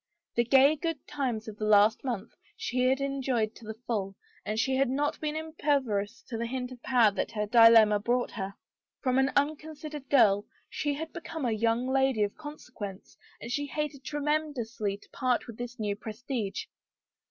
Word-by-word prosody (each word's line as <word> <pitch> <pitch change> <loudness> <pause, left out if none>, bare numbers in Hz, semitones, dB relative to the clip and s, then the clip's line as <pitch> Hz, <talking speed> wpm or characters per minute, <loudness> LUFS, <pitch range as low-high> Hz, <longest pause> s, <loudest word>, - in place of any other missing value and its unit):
The 235 - +3
gay 275 +5 +6
good 330 +1 -3
times 250 -7 -2
of 215 -1 -7
the 215 - -2
last 215 +2 +5
month 235 -5 -3 0.3
she 250 0 0
had 265 +1 +2
enjoyed 260 -5 0
to 230 - -14
the 220 0 -6
full 195 -4 -2 0.3
and 215 - -3
she 265 +3 +1
had 270 -1 +2
not 290 +3 0
been 305 0 -2
impervious 280 -10 -1
to 230 -3 -6
the 235 - -1
hint 250 0 -4
of 250 -2 -11
power 240 -5 +4
that 205 - -3
her 210 -1 -1
dilemma 225 -2 +7
brought 240 +4 0
her. 195 -2 -5 0.5
From 255 -1 +2
an 265 +1 +3
unconsidered 300 0 -2
girl 205 -7 +4 0.2
she 290 -1 -2
had 320 +2 -6
become 320 -4 -5
a 240 - +1
young 230 +3 +1
lady 265 -4 +2
of 205 - -1
consequence 250 -10 -9 0.2
and 235 - -7
she 290 +3 -1
hated 290 -1 -4
tremendously 285 -9 -2
to - - -21
part 255 -2 0
with 230 -3 -10
the 245 0 -4
new 210 -3 -1
prestige. 220 0 -4
250 Hz, 180 wpm, -29 LUFS, 220-280 Hz, 0.5 s, dilemma